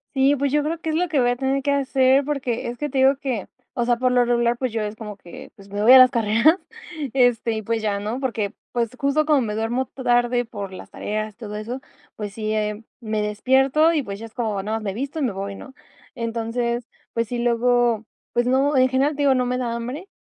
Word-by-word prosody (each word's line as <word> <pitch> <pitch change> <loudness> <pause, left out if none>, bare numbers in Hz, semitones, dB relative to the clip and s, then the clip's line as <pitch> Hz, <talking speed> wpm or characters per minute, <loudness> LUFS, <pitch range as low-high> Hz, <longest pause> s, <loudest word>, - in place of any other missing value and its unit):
Sí, 275 +2 +4
pues, 280 0 -1
yo 295 +1 +2
creo 320 +2 -2
que 320 - -4
es 310 - 0
lo 355 +2 +1
que 305 -3 +1
voy 245 -1 +3
a - - 0
tener 270 +2 0
que 285 - 0
hacer, 270 -1 +3
porque 260 -6 -2
es 240 - -6
que 295 +2 -3
te 265 0 -1
digo 270 +1 +5
que 255 -8 -3 0.3
o 235 - +2
sea, 240 - +3
por 255 0 +1
lo 245 -1 +4
regular, 240 0 +2
pues, 255 -1 -2
yo 225 0 -2
es 210 0 -4
como 210 -2 -8
que, 175 -3 -12
pues, 200 -1 -16
me 205 +1 -2
voy 240 - +7
a 260 - +11
las 255 - +8
carreras, 230 - +3 0.6
este, 245 -3 +3
y, 220 -1 -2
pues, 225 +2 -1
ya, 200 -2 0
¿no? 215 +5 -3
Porque, 225 -7 -2 0.2
pues, 235 -2 0
justo 280 +2 +2
como 295 -4 +4
me 210 -2 -2
duermo 230 +4 -1
ta 260 - -10
tarde 245 0 +2
por 200 -4 -7
las - - -10
tareas, 215 0 -4
todo 210 -3 -7
eso, 235 +5 -5 0.4
pues 205 -2 -6
sí, 215 0 -3
eh, 210 0 -2 0.2
me 215 -2 -2
despierto, 265 +9 +3
y, 305 - +1
pues, 200 -6 -6
ya 225 - -8
es 225 - -13
como, 215 -5 -2
nada 215 +2 -2
mas 220 - -7
me 195 -2 -2
visto 280 +6 -4
y - - -2
me 250 -6 +1
voy, 195 +1 -5
¿no? 265 +6 -11 0.4
Entonces, 235 0 -2 0.3
pues 230 -1 -1
sí, 245 +2 -3
luego, 240 -1 +2 0.3
pues 240 +1 +1
no 275 +3 +2
en 260 0 +5
general, 275 +3 +1
te 290 - -3
digo, 270 -2 +4
no 250 - +1
me 250 +1 -1
da 235 -2 -2
hambre, 250 +10 -5
240 Hz, 250 wpm, -22 LUFS, 220-265 Hz, 0.6 s, a